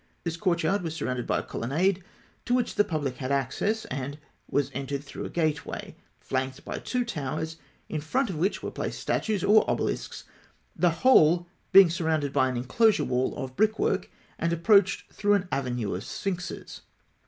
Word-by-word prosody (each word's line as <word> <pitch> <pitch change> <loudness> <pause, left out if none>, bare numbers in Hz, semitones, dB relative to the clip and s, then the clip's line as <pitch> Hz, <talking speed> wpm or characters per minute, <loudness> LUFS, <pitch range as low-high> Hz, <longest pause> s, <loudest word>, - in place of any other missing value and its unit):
This 170 -2 -2
courtyard 170 +1 +1
was 165 -2 -4
surrounded 125 -5 -3
by - - +1
a - - -2
colonnade 175 +10 0 0.4
to 245 - +2
which 245 -2 0
the 205 - +4
public 145 -8 -3
had 130 0 -3
access, 140 - 0
and 135 +2 -4 0.3
was 145 -2 0
entered 140 +1 -3
through 145 - -7
a - - -5
gateway 155 -3 -2 0.2
flanked 130 0 -3
by - - -4
two 250 -1 -1
towers, 160 - -4 0.3
in 155 - -3
front 235 - 0
of - - -5
which 180 +7 -1
were - - -3
placed - - -4
statues, 210 -3 -1
or 210 +2 +6
obelisks; - - -2 0.5
the 175 - +3 0.2
whole 175 -9 +6 0.3
being 195 -3 +8
surrounded 160 -4 0
by 130 -2 +3
an 125 - -2
enclosure 200 - +3
wall 125 +1 0
of 130 -2 -5
brickwork, 215 +2 +1 0.3
and 170 - 0
approached 195 +4 +3
through 205 0 +3
an 190 -2 -1
avenue 125 -6 -1
of 90 +3 -4
sphinxes. 180 -3 -5
160 Hz, 170 wpm, -27 LUFS, 135-195 Hz, 0.5 s, being